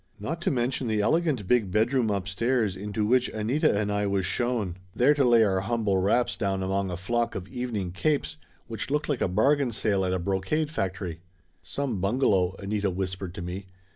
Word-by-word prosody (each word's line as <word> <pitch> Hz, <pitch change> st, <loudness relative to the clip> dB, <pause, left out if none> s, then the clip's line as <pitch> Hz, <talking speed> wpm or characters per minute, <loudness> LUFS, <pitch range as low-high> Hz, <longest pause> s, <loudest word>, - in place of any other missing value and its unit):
Not 160 Hz, +11 st, -4 dB
to -, -, +1 dB
mention 130 Hz, 0 st, -1 dB
the 110 Hz, -1 st, 0 dB
elegant 145 Hz, -, +1 dB
big 115 Hz, -4 st, +3 dB
bedroom 115 Hz, +4 st, +2 dB
upstairs 100 Hz, +2 st, 0 dB
into 105 Hz, +2 st, -2 dB
which 125 Hz, +3 st, +3 dB
Anita 110 Hz, +2 st, +1 dB
and 105 Hz, -1 st, -1 dB
I 105 Hz, 0 st, 0 dB
was 100 Hz, -2 st, 0 dB
shown, 110 Hz, -4 st, -1 dB, 0.2 s
there 135 Hz, +5 st, +5 dB
to 145 Hz, -2 st, +2 dB
lay 120 Hz, -2 st, +6 dB
our 95 Hz, -3 st, +2 dB
humble 105 Hz, -1 st, 0 dB
wraps 105 Hz, +6 st, +2 dB
down 95 Hz, -3 st, -1 dB
among 95 Hz, 0 st, -1 dB
a 90 Hz, -, -4 dB
flock 120 Hz, +6 st, -1 dB
of 95 Hz, 0 st, -5 dB
evening 110 Hz, -7 st, -3 dB
capes 145 Hz, -, -1 dB, 0.3 s
which 115 Hz, +1 st, -4 dB
looked 150 Hz, +2 st, -1 dB
like 140 Hz, -5 st, 0 dB
a -, -, +3 dB
bargain 130 Hz, +8 st, +2 dB
sale 105 Hz, -3 st, +1 dB
at 90 Hz, -, 0 dB
a 95 Hz, -, +1 dB
brocade 100 Hz, -, -1 dB
factory. 90 Hz, -, -3 dB, 0.4 s
"Some 130 Hz, -9 st, -3 dB
bungalow!" 100 Hz, -4 st, +2 dB
Anita 100 Hz, 0 st, -1 dB
whispered 95 Hz, 0 st, -4 dB
to 95 Hz, -, -5 dB
me. 95 Hz, +3 st, -6 dB
105 Hz, 190 wpm, -27 LUFS, 95-125 Hz, 0.4 s, lay